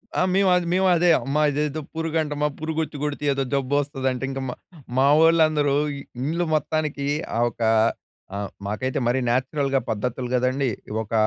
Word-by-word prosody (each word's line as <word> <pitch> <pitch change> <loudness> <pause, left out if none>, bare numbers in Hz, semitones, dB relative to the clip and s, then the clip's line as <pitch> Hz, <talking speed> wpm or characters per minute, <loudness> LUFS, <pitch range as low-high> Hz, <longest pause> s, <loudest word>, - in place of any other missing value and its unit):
ఆ! - - +2
మేవద్ 185 -2 +3
మేవదే. 180 -1 +3
అమ్మా 140 +4 0
ఇదేదో 150 +1 -1 0.2
పురుగంటమా. 155 -2 -1
పురుగొచ్చి 155 -1 -3
గొడితే 150 0 -3
ఏదో 135 0 -1
జబ్బొస్తదంట. 135 -1 -1
ఇంక 135 0 -4
మా - - -3 0.4
మావోళ్ళందరూ 155 +1 +4 0.2
ఇ - - -7 0.2
ఇండ్లు 165 +6 -1
మొత్తానికీ 155 -2 -1 0.3
ఆహ్, 120 - +3
ఒకా 115 -1 -1 0.7
ఆహ్, 100 0 -3 0.2
మాకైతే 130 +7 -2
మరీ 125 +2 +2
నాచురల్‍గా 135 +2 +1
పద్ధతులు 120 +3 -2
గదండీ. 130 +2 +1 0.3
ఒక 110 0 -8
145 Hz, 135 wpm, -23 LUFS, 130-155 Hz, 0.7 s, మావోళ్ళందరూ